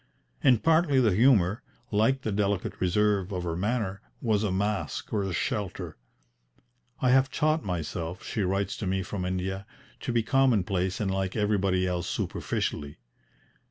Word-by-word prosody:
And 125 -5 +4
partly 160 -4 +4
the 110 -6 +4
humour, 110 -1 +4 0.3
like 115 +6 +2
the 110 - -1
delicate 100 -1 -1
reserve 100 +1 +2
of 90 -2 -3
her 85 -2 -2
manner, 100 0 -1 0.2
was 110 -3 +1
a 105 - 0
mask 95 -4 -2
or 105 - +1
a 95 -1 -2
shelter. 90 +5 -3 1.0
"I 125 - +3
have 135 +1 +4
taught 155 +2 +1
myself," 85 0 -4
she 110 - -3
writes 95 +1 0
to 100 - -3
me 95 +1 0
from 95 -1 -4
India, 95 +2 -3 0.3
"to - - -3
be 115 -1 +2
commonplace 100 -8 +2
and 100 -3 0
like 95 -1 -2
everybody 100 -3 +1
else 90 -1 -2
superficially. 70 0 -3
100 Hz, 155 wpm, -28 LUFS, 90-115 Hz, 1.0 s, And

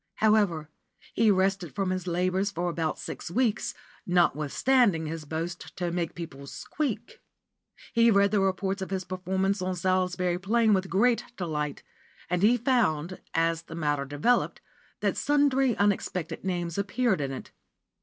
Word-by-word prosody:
However, 205 -8 +2 0.5
he 225 - +3
rested 190 -4 +1
from 195 -2 0
his 185 -1 -3
labours 185 +3 +1
for 175 -3 -2
about 160 -2 -2
six - - -6
weeks, 230 +3 0 0.3
notwithstanding 175 - +3
his 155 0 -5
boast 165 +3 -5
to 175 -2 -1
make 170 -2 -2
people 145 -5 -8
"squeak." 295 - -4 0.7
He 230 0 +5
read 200 -2 +4
the 210 - +3
reports 195 0 0
of 190 - -4
his 190 -1 -2
performance 190 +2 -1
on 185 0 -1
Salisbury 180 0 0
Plain 220 +3 +3
with 190 -1 0
great 230 +6 +3
delight, 150 -5 -3 0.5
and 180 0 +1
he 230 +4 +5
found, 190 - +1
as 165 0 +2
the 165 - -10
matter 145 -3 0
developed, 145 - +1 0.4
that - - 0
sundry 275 -4 +2
unexpected 190 -4 -1
names 175 -1 -2
appeared 200 -2 +1
in 135 -1 -2
it. 130 - -7
185 Hz, 145 wpm, -28 LUFS, 170-205 Hz, 0.7 s, He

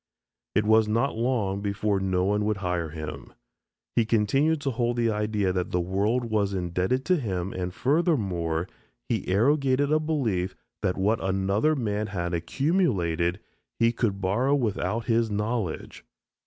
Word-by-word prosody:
It 105 - +3
was 110 0 +5
not 115 +6 +1
long 110 -5 0
before 100 0 0
no 95 -1 0
one 105 +1 +1
would 105 -1 0
hire 90 -3 -2
him. 80 0 -7 0.6
He 115 - +4
continued 125 +9 +2
to 140 - -1
hold 120 0 -1
the 115 -1 +2
idea 105 -3 0
that 90 -1 -1
the 90 - 0
world 100 +7 0
was 105 -3 0
indebted 90 +9 -1
to 180 -1 +3
him 95 - -3
and 90 -1 -3
furthermore, 95 - 0 0.4
he - - -1
arrogated 135 +6 +2
a 155 - +4
belief 125 - -1 0.3
that 90 - 0
what 105 +4 +1
another 100 +10 +1
man 105 -5 -1
had 90 -3 -3
accumulated 90 - 0 0.4
he 115 0 +3
could 110 -4 -1
borrow 120 +9 +2
without 115 -2 -1
his 115 0 +2
knowledge. 105 -4 -3
105 Hz, 150 wpm, -26 LUFS, 95-120 Hz, 0.6 s, was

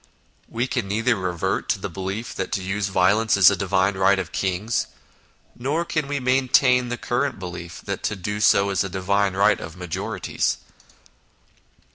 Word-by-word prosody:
We 120 +2 -1
can 120 -5 -2
neither 115 +4 +1
revert 90 -4 -2
to - - +1
the - - -4
belief 100 +4 -5
that 95 - -4
to 95 - -1
use 95 +2 -1
violence 100 +4 +3
is 100 0 +8
a - - +1
divine 95 +1 +1
right 95 +1 +3
of 90 -4 -4
kings, 100 +4 -1 0.7
nor 145 +7 -1
can 155 -3 -2
we 145 0 -2
maintain 125 -1 +3
the 120 - -3
current 125 +3 -1
belief 90 -2 -8
that - - -4
to 105 - -1
do 105 +2 -4
so 100 -1 +4
is 95 -1 +1
a 95 - -4
divine 95 +1 0
right 100 +1 +3
of 80 +2 -9
majorities. 90 -3 -2
100 Hz, 170 wpm, -23 LUFS, 95-120 Hz, 0.7 s, is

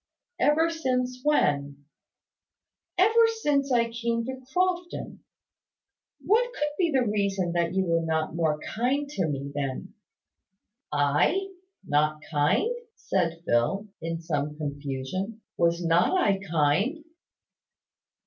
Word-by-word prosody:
"Ever 320 +3 +3
since 255 -5 -1
when?" 145 - +1 1.1
"Ever 445 +5 +5 0.2
since 280 -2 +2
I 235 -2 +2
came 230 0 -1
to 260 +1 -6
Crofton. 360 0 -1 1.1
What 460 +7 +3
could 295 -7 -1
be 350 -3 +3
the 265 -5 +2
reason 200 -4 0
that 170 +1 0
you 190 0 +2
were 165 -1 +2
not 160 -1 -1
more 160 -3 +1
kind 265 +6 -1
to 190 - -1
me 140 -1 -4
then?" 140 +5 -4 1.0
"I! 150 - +2 0.4
Not 150 -1 +1
kind?" 150 - +2 0.2
said 170 -3 -1
Phil, 195 - +1
in 165 0 -3
some 150 -3 -2
confusion. 145 +8 -4
"Was 170 0 +1
not 170 - +3
I 200 - +2
kind?" 170 - +1
190 Hz, 115 wpm, -27 LUFS, -, 1.1 s, Ever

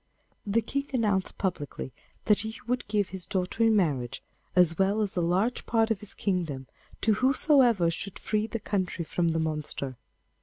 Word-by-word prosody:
The 220 +3 +2
King 280 0 -2
announced 205 -6 +1
publicly 145 -8 -3 0.3
that 210 -2 +4
he 220 +1 -4
would 245 +2 -1
give 205 -2 +1
his 185 -2 -6
daughter 185 +4 -2
in 225 -1 +5
marriage, 140 - 0 0.3
as 175 -2 +4
well 200 +3 +3
as 200 - -3
a 175 - +1
large 185 +8 +1
part 225 -1 +2
of 215 - +1
his 210 - -5
kingdom, 165 -9 -1 0.4
to 220 - +4
whosoever 255 - +4
should 200 +3 -4
free 215 0 -1
the 230 +1 -4
country 185 -5 -2
from 170 +2 0
the 165 0 +1
monster. 150 -4 -3
195 Hz, 175 wpm, -28 LUFS, 170-220 Hz, 0.4 s, in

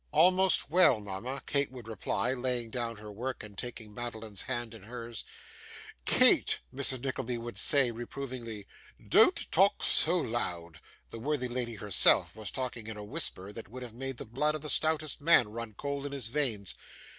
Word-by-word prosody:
'Almost 185 +4 +4
well, 170 -9 +5
mama,' 105 +7 -6
Kate 140 -2 0
would 125 -3 -10
reply, 110 +2 -1
laying 125 -3 -2
down 120 -1 -3
her 105 0 -10
work, 125 +5 -5
and 105 -1 -11
taking 110 -1 -6
Madeline's 110 -3 -5
hand 120 -3 -3
in 110 - -11
hers. 115 +1 -6 0.8
'Kate!' - - +5
Mrs. 130 -2 0
Nickleby 125 -2 -3
would 120 0 -3
say, 140 -4 +4
reprovingly, 120 -3 -7 0.4
'don't - - +4
talk 195 +4 +3
so 170 +3 +5
loud' 85 - -3 0.3
(the 115 - -7
worthy 135 +1 -1
lady 120 -1 -4
herself 105 -2 +4 0.2
talking 125 -4 -5
in 110 -1 -6
a 105 - -7
whisper 105 - -3
that 110 -4 -8
would 125 +3 -8
have 120 -3 -8
made 135 +1 -6
the - - -6
blood 150 +7 0
of 155 - -5
the 150 - 0
stoutest 155 -2 +2
man 145 -8 +5
run 115 -1 -7
cold 140 +2 -4
in 140 - -8
his 130 -5 -3
veins). 115 -8 -1
120 Hz, 170 wpm, -30 LUFS, 110-140 Hz, 0.8 s, well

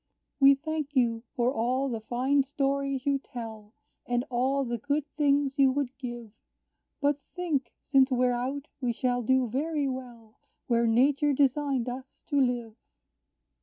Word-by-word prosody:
"We 275 0 +8
thank 300 0 -4
you 230 -3 +2
for 245 +1 +1
all 255 +3 0
the 230 -4 -3
fine 255 +5 +1
stories 275 -1 -1
you 280 -1 +2
tell, 225 -5 -9 0.3
And 245 +1 0
all 265 +3 +1
the 235 -1 -3
good 285 +4 -1
things 285 -1 +2
you 270 -1 +6
would 270 -2 -2
give; 240 -4 -6 0.7
But 285 -1 +1
think, 305 -9 -1
since 270 -1 +4
we're 250 -1 +2
out, 265 +4 -3
we 245 -2 0
shall 245 +1 0
do 260 +2 +2
very 290 +4 -1
well 240 -4 -8 0.3
Where 235 -1 +2
nature 280 +5 +3
designed 275 -2 +1
us 260 +2 -7
to 285 -3 +3
live. 240 -3 0
260 Hz, 150 wpm, -28 LUFS, 240-280 Hz, 0.7 s, We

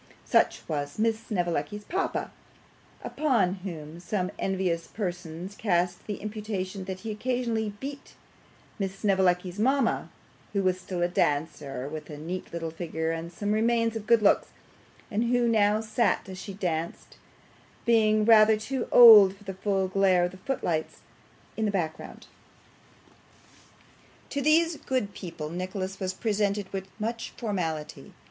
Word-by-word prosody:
Such - - +2
was 145 -2 -3
Miss 220 0 +1
Snevellicci's 175 0 -2
papa, 375 - -2 0.7
upon 255 -12 +1
whom 165 -3 -7
some 180 +1 -2
envious 185 -3 -1
persons 180 -2 -5
cast 180 -4 0
the 210 - -2
imputation 205 -3 -5
that 185 0 -6
he 225 - -4
occasionally 225 -1 -1
beat 280 +1 -8 0.6
Miss 195 -1 -2
Snevellicci's 190 -2 +1
mama, 265 +2 +1 0.4
who 200 -1 +1
was 185 0 +1
still 180 -1 -3
a - - +3
dancer, 145 -5 -1
with 155 +2 -7
a 150 - -7
neat 175 +5 -6
little 165 -1 -4
figure 160 -1 -3
and 165 +1 -5
some 205 +4 -3
remains 230 +1 +2
of 215 -1 -5
good 230 -2 +5
looks; 200 - +4 0.6
and 220 +3 +1
who 240 0 +2
now 215 -1 +3
sat, 220 -1 0
as 185 -1 -8
she 195 +1 -7
danced, 170 -4 -4 0.7
being 215 -2 +4
rather 220 -1 +7
too 245 +4 -3
old 215 -5 +10
for 200 - -18
the 195 -1 -5
full 190 0 0
glare 185 -2 +3
of 175 - 0
the 185 - -12
foot 270 +8 -4
lights, 160 -2 -2 0.5
in 220 - -1
the - - +1
background. 165 -5 -4 2.1
To 280 - -1
these 320 +2 +3
good 255 -9 -2
people 160 -4 -7
Nicholas 185 +2 -4
was 185 -2 -1
presented 205 -2 -1
with 190 0 -4
much 230 +2 -3
formality. 170 -9 -4
195 Hz, 145 wpm, -27 LUFS, 175-220 Hz, 2.1 s, old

